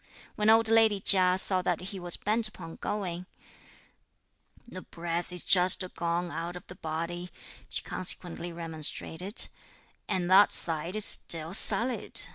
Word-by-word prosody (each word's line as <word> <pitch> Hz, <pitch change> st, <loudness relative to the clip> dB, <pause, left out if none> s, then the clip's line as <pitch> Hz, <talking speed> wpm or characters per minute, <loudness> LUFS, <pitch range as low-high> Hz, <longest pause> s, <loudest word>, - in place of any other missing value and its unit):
When 210 Hz, +1 st, 0 dB
old 225 Hz, 0 st, +4 dB
lady 220 Hz, -2 st, +2 dB
Chia 185 Hz, -1 st, +4 dB
saw 185 Hz, -1 st, +6 dB
that 180 Hz, -2 st, -3 dB
he 195 Hz, -, -8 dB
was 175 Hz, -1 st, -1 dB
bent 220 Hz, +2 st, 0 dB
upon 165 Hz, -6 st, -12 dB
going: 180 Hz, -3 st, -6 dB, 1.4 s
"The 185 Hz, -5 st, -10 dB
breath 170 Hz, +1 st, -6 dB
is 180 Hz, -1 st, -7 dB
just 185 Hz, 0 st, +3 dB
gone 170 Hz, +1 st, -4 dB
out 170 Hz, +2 st, -7 dB
of 180 Hz, -, -11 dB
the -, -, -12 dB
body," 170 Hz, +1 st, -7 dB, 0.4 s
she -, -, -2 dB
consequently 175 Hz, -1 st, -3 dB
remonstrated, 165 Hz, -, -2 dB, 0.6 s
"and 185 Hz, -3 st, -2 dB
that 200 Hz, +2 st, +5 dB
side 165 Hz, +3 st, -4 dB
is 215 Hz, -, +3 dB
still 165 Hz, +1 st, 0 dB
sullied. 240 Hz, +4 st, +5 dB
180 Hz, 140 wpm, -27 LUFS, 170-200 Hz, 1.4 s, saw